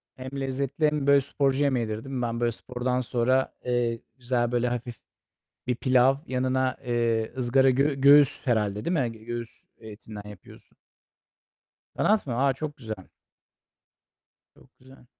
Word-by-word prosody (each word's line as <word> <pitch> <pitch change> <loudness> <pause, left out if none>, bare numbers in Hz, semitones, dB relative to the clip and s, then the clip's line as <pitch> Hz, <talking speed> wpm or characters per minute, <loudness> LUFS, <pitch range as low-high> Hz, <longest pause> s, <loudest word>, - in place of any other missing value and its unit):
Hem 130 0 -7
lezzetli 135 +3 -1
hem 150 -2 0
böyle, 140 -1 +6
sporcu 140 0 0
yemeğidir, 115 -5 -1
değil 135 -1 -7
mi? 125 - -2
Ben, 115 0 -2
böyle, 120 -1 +1
spordan 125 +2 -3
sonra, 125 +2 +1
eee, 120 -2 0 0.2
güzel, 120 -1 -1
böyle, 120 0 +1
hafif 120 -1 -4 0.7
bir 125 - +1
pilav 130 +1 +3
yanına, 130 0 0
eee, 115 -2 0
ızgara 130 +2 +3
gö 140 +3 +2
göğüs 140 +1 +5
herhâlde, 105 -4 0
değil 175 - 0
mi? 125 -8 0
Göğüs 120 -1 -7 0.2
etinden 105 -1 -10
yapıyorsun. 100 -4 -15 1.2
Kanat 210 -7 +2
mı? 120 - -2
Aaa, 135 +1 +2
çok 150 +2 -6
güzel! 110 -7 -8 1.5
Çok - - -23
güzel. 130 0 -18
125 Hz, 140 wpm, -26 LUFS, 120-135 Hz, 1.5 s, böyle